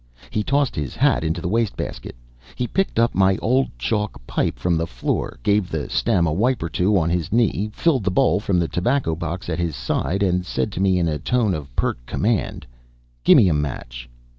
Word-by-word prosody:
He 105 - 0
tossed 140 +2 +1
his 75 -4 -4
hat - - +2
into 80 0 -1
the - - -3
waste 115 +2 0
basket. - - -6 0.4
He 125 - -1
picked 195 - -1
up 115 +1 +3
my 95 0 +3
old 130 +4 +2
chalk 105 - -2
pipe - - -1
from 90 -1 0
the 80 +1 -1
floor, - - -3
gave 100 -3 +2
the 80 -3 -4
stem 100 -7 +2
a 80 - 0
wipe 115 +4 +1
or 85 - -3
two 95 +5 +2
on 85 -2 +1
his 85 -3 -1
knee, 110 -2 +1
filled 135 - +1
the - - +3
bowl 125 +4 +3
from 100 -3 0
the 85 -1 +1
tobacco 120 +1 0
box 85 +2 -5
at 85 -1 -2
his 85 -4 -1
side, 85 +10 -1
and 90 -1 +1
said 100 - -2
to 95 - -4
me 95 -1 +3
in 85 -2 +1
a 75 -2 -1
tone 115 - +1
of 75 -4 -5
pert - - -1
command: 110 - -1 0.6
"Gimme 95 - +7
a 85 - +3
match!" - - -4
95 Hz, 215 wpm, -22 LUFS, 80-110 Hz, 0.6 s, Gimme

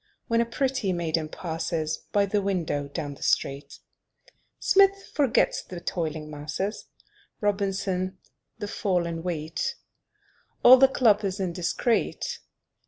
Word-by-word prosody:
When 230 0 +3
a 235 - 0
pretty 255 -4 0
maiden 165 -2 -1
passes 160 -2 -3
By 205 -1 +3
the 205 +1 0
window 170 -7 -1
down 145 0 -5
the - - -16
street. 140 +1 -1 0.8
Smith 395 0 +3
forgets 275 -6 +2
the 180 - -8
"toiling 160 -3 -3
masses," 155 +8 -4 0.5
Robinson, 195 -2 -1 0.4
the 205 - -4
fall 185 -4 0
in 165 -1 -4
wheat; 165 -1 -3 0.9
All 255 +1 +10
the 270 +1 +7
club 220 -5 +3
is 195 0 -2
indiscret. 185 +5 -1
185 Hz, 120 wpm, -26 LUFS, 160-210 Hz, 0.9 s, All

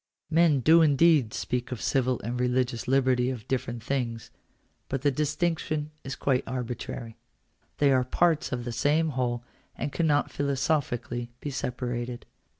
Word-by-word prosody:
Men 160 -4 +4
do 160 +6 +6
indeed 150 -5 +4
speak 125 +2 -3
of 125 - -4
civil 130 -2 +1
and 120 +3 -3
religious 125 -1 0
liberty 130 -1 +3
as 125 -4 -5
different 120 -2 -3
things: 120 -4 -3 0.6
but 135 0 -2
the 145 - +4
distinction 155 +1 -1
is 135 0 -5
quite 130 -2 +1
arbitrary. 120 -2 -5 0.6
They 145 -1 +4
are 130 -1 +4
parts 160 +4 +1
of 120 -2 -3
the 120 - -3
same 155 +6 +2
whole 125 -3 -1 0.3
and 145 - -3
cannot 150 -3 +1
philosophically 130 -4 -1
be 145 - -5
separated. 125 -1 -4
130 Hz, 145 wpm, -27 LUFS, 120-145 Hz, 0.6 s, do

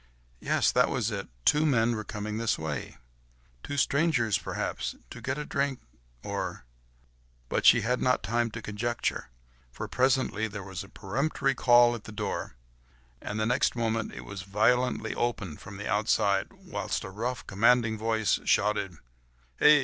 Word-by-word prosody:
Yes! - - +2
that - - +3
was - - -1
it! - - -4 0.2
two 150 +1 +5
men 120 -6 +3
were 110 - -4
coming 105 +1 -4
this 115 -1 +1
way. 80 -2 -5 0.6
Two 145 - -5
strangers 140 - +2
perhaps, 85 - -3 0.2
to - - -9
get 130 +2 -2
a 150 - -4
drink, 140 -2 -1 0.4
or... - - -4 0.8
But - - +2
she - - +8
had 125 +2 0
not 125 -4 +2
time 115 +4 0
to 115 0 -8
conjecture, 115 - -2 0.4
for - - -6
presently 130 -4 +1
there 105 -2 -7
was 95 -1 -6
a 100 - -14
peremptory 135 +7 -1
call 120 -2 +5
at 115 -3 -7
the - - -8
door, 105 - -4 0.7
and 105 - -4
the 110 - +1
next 125 +3 +2
moment 115 -2 -1
it - - -8
was 100 -2 -6
violently 110 +4 +1
thrown - - -1
open 100 -10 -2
from 100 0 -10
the 105 - -5
outside, 100 -1 +1
whilst 190 -9 -4
a 95 - -7
rough, 120 +5 -3
commanding 115 +2 +3
voice 110 0 +1
shouted,— 100 -4 +1 0.6
"Hey! 150 0 +7
115 Hz, 165 wpm, -28 LUFS, 105-125 Hz, 0.8 s, she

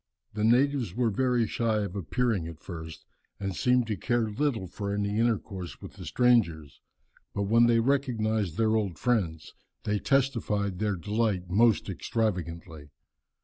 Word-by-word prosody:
The 105 0 -2
natives 125 -3 +2
were 120 -2 +1
very 125 +1 +1
shy 110 -1 0
of 100 -1 -5
appearing 100 - -1
at 80 -1 -9
first, 80 -3 -9 0.3
and 95 -2 -3
seemed 125 -1 +2
to 110 -2 -2
care 115 +2 0
little 120 -4 -1
for 100 +3 -5
any 105 +1 -1
intercourse 105 -6 -2
with - - -10
the - - -10
strangers; 95 - +2 0.5
but 100 - 0
when 115 +4 +4
they 115 -1 +4
recognized 110 - 0
their 110 -1 +2
old 100 -7 -1
friends, 85 -8 -1 0.3
they 105 0 0
testified 110 -8 0
their 105 -2 0
delight 100 -1 -1
most 110 +2 +3
extravagantly. 90 - -3
105 Hz, 145 wpm, -28 LUFS, 95-120 Hz, 0.5 s, when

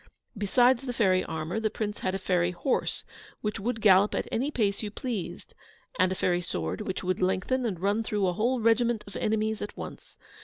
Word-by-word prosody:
Besides 240 +5 +3
the 255 -2 -4
fairy 190 -6 +3
armour, 160 +5 -3
the 220 -1 0
Prince 210 -1 -4
had 185 0 -1
a - - +1
fairy 180 -2 +1
horse, 180 +9 -1 0.4
which 210 -1 -2
would 225 +2 -2
gallop 200 0 +5
at - - -1
any 260 +6 0
pace 205 -8 0
you 210 - -3
pleased; 215 -3 -5 0.5
and 185 +1 +4
a - - 0
fairy 175 -1 +1
sword, 85 - -3
which 190 - -3
would 185 0 -1
lengthen 215 +7 +1
and 185 -6 -3
run 200 +4 +1
through 210 -3 0
a 180 - +1
whole 240 +7 +1
regiment 230 0 +3
of 200 - -12
enemies 220 0 0
at 205 - -6
once. - - -9
210 Hz, 200 wpm, -28 LUFS, 185-225 Hz, 0.5 s, gallop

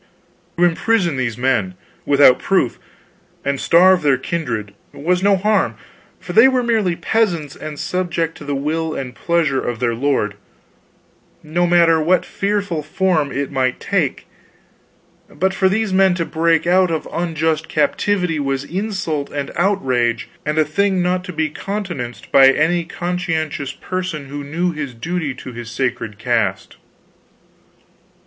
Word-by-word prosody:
To 175 - +2
imprison 175 -1 +2
these 120 -4 -2
men 120 -8 0 0.3
without 140 -3 +6
proof, 190 -11 0 0.7
and 140 -1 -1
starve 185 +2 +5
their 140 -3 +3
kindred, 130 - -3 0.2
was 180 +5 0
no 200 0 +4
harm, 195 - +1 0.4
for 175 - -7
they 225 +7 +8
were 255 -2 +1
merely 220 -7 +1
peasants 170 -10 0
and 155 -1 -7
subject 175 -2 -2
to - - -9
the 145 -1 -3
will 155 +3 -2
and 130 -2 -5
pleasure 160 -4 0
of 120 -2 -3
their 120 -2 0
lord, 120 -4 0 1.1
no 175 +3 0
matter 170 -2 +4
what 180 +4 +2
fearful 200 -5 -2
form 155 -1 0
it 140 0 -3
might 130 -2 0
take; - - -1 1.0
but 190 +5 -1
for 190 0 +2
these 210 0 0
men 190 -1 +4
to 170 -2 -1
break 165 0 +1
out 180 +1 +4
of 160 -2 -2
unjust 160 -2 -1
captivity 170 +2 0
was 135 -1 -1
insult 180 -6 -3
and 140 -1 -4
outrage, 130 - 0 0.2
and 150 +1 -1
a 155 - +4
thing 190 +3 +1
not 180 0 0
to 185 - -6
be 160 -2 -1
countenanced 175 -12 -5
by 135 -1 +7
any 165 +5 +2
conscientious 165 -5 -3
person 170 -2 -5
who 145 +1 -5
knew 170 +5 -1
his 145 -6 -6
duty 160 +1 -3
to 130 -1 -9
his 120 -1 -7
sacred 120 -4 -3
caste. 110 -5 -1
160 Hz, 145 wpm, -19 LUFS, 135-180 Hz, 1.1 s, they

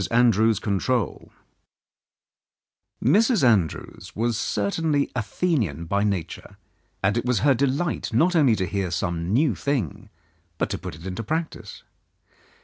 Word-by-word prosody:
ANDREWS'S 115 -2 +4
CONTROL 105 +2 -1 1.7
Mrs. 215 - +4
Andrews 100 - 0
was 115 +2 0
certainly 140 +9 0
Athenian 110 - -1
by 100 +4 0
nature, 95 -6 -3 0.5
and 105 +3 +2
it - - -3
was 125 -5 +1
her 140 -1 +5
delight 140 +6 -1
not 180 +2 +3
only 140 -8 +4
to 95 - -1
hear 95 -1 -2
some 85 0 -2
new 130 +3 +3
thing, 120 - -3 0.5
but - - -1
to - - -3
put - - -7
it 80 +3 -13
into 95 +3 -4
practice. 135 -4 -4
115 Hz, 130 wpm, -24 LUFS, 100-140 Hz, 1.7 s, her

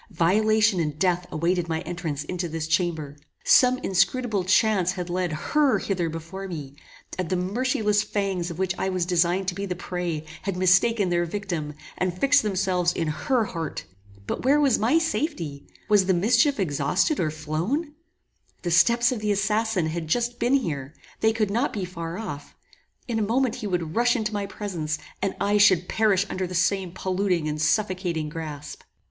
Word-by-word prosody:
Violation 215 +3 +3
and 150 -3 -2
death 180 0 +1
awaited 170 +2 0
my 160 0 -1
entrance 170 -5 -4
into 175 +2 -4
this 160 0 -3
chamber. 160 -3 -1 0.3
Some 255 0 +5
inscrutable 195 +3 +1
chance 185 -1 +3
had 180 -2 -5
led 180 -1 -1
HER 280 - +2
hither 175 -4 -1
before 165 +5 -7
me, 145 -6 -7 0.4
and 180 -3 -2
the 185 - +1
merciless 210 +3 +1
fangs 195 -5 -2
of 170 - -7
which 190 -1 0
I 190 - 0
was 185 -2 0
designed 180 +1 +1
to - - -4
be 200 +2 -4
the 180 - -3
prey, 175 -3 -4 0.2
had 195 -2 -3
mistaken 185 +3 +3
their 175 0 +1
victim, 170 -5 -4 0.2
and 185 - +1
had 180 +1 -8
fixed 285 +1 +5
themselves 185 -4 0
in 165 -2 -1
HER 230 - 0
heart. 165 -6 -5 0.4
But - - -4
where 280 +4 +4
was 275 -5 +3
my 240 +9 +3
safety? 235 - -2 0.2
Was 205 -3 +4
the 190 - +3
mischief 235 - +3
exhausted 180 - +1
or 160 - +1
flown? 165 - -2 0.7
The 175 - -1
steps 235 +9 +4
of 250 - -2
the 210 0 0
assassin 210 -1 +1
had 160 0 -3
just 240 +7 0
been 245 +4 +3
here; 150 - -2 0.2
they 220 - +3
could 215 -2 -1
not 240 +7 +1
be 200 -4 -3
far 170 -1 -6
off; 185 -10 -7 0.5
in 230 -3 -1
a - - 0
moment 235 +3 +1
he 210 - -4
would 175 -4 -2
rush 240 +1 +3
into 215 -3 -2
my 200 -1 -2
presence, 175 -7 -4 0.2
and 195 - -1
I 205 +1 +2
should 185 -4 +5
perish 205 -3 +2
under 185 -1 -3
the 180 - -6
same 185 0 +1
polluting 185 -3 -1
and 150 0 -3
suffocating 175 -2 0
grasp! 150 -2 -7
185 Hz, 180 wpm, -25 LUFS, 170-215 Hz, 0.7 s, Some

